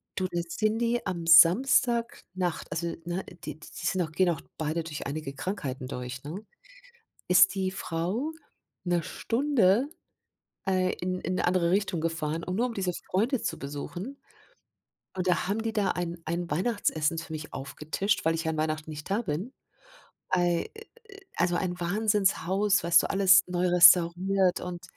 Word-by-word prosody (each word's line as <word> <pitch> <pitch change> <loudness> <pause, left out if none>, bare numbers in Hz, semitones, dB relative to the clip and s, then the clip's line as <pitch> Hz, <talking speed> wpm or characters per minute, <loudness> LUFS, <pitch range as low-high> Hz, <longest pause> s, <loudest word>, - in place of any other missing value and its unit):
Du 185 -2 -1
dann 175 -1 -1
sind 215 +5 0
die 235 0 0
am 175 -3 -4
Samstagnacht 185 - +3
also 165 +3 -2 0.2
ne, 175 +2 -3 0.2
die 155 -2 -7
die - - -13 0.2
sind 185 +1 +1
auch 160 -3 -3
gehen 180 +3 +2
auch 165 - -4 0.2
beide 160 +1 -2
durch 155 -2 -6
einige 140 -1 -5
Krankheiten 135 -7 -4
durch, 125 0 -6
ne 170 +9 -7 0.9
ist 180 +2 +6
die 190 -1 -1
Frau 190 - -3 0.5
'ne 175 -1 +1
Stunde, 240 - +1 0.8
äh, 185 -1 +2
in 185 +1 -2
in 185 - -3
'ne - - 0
andere 175 -2 +2
Richtung 195 -4 0
gefahren, 160 0 -2
um 180 - -4
nur 240 +4 +2
um 240 - -5
diese 185 -3 -1 0.2
Freunde 230 +7 +1
zu - - -3
besuchen. 175 - -7 1.0
Und 185 -1 -2
da 180 -1 +1
haben 205 +3 -1
die 225 -1 -2
da 210 -3 +1
ein 175 -1 -4
ein 170 +1 -3
Weihnachtsessen 165 -3 0
für 160 0 -6
mich 155 0 -7
aufgetischt, 155 +9 -2
weil 165 0 +2
ich 165 - -3
ja 160 - -1
an 155 - -5
Weihnachten 155 0 -2
nicht 150 -1 -8
da 200 +4 +1
bin. 180 - -3 0.8
Ei 175 -2 +1
a - - -9
a 405 - -8
also 175 0 +1
ein 175 0 -2
Wahnsinnshaus, 200 0 +1
weißt 170 0 +5
du, - - -3
alles 195 -1 +6
neu 180 0 0
restauriert 180 +2 +5
und 180 -1 -6
180 Hz, 170 wpm, -28 LUFS, 165-200 Hz, 1.0 s, ist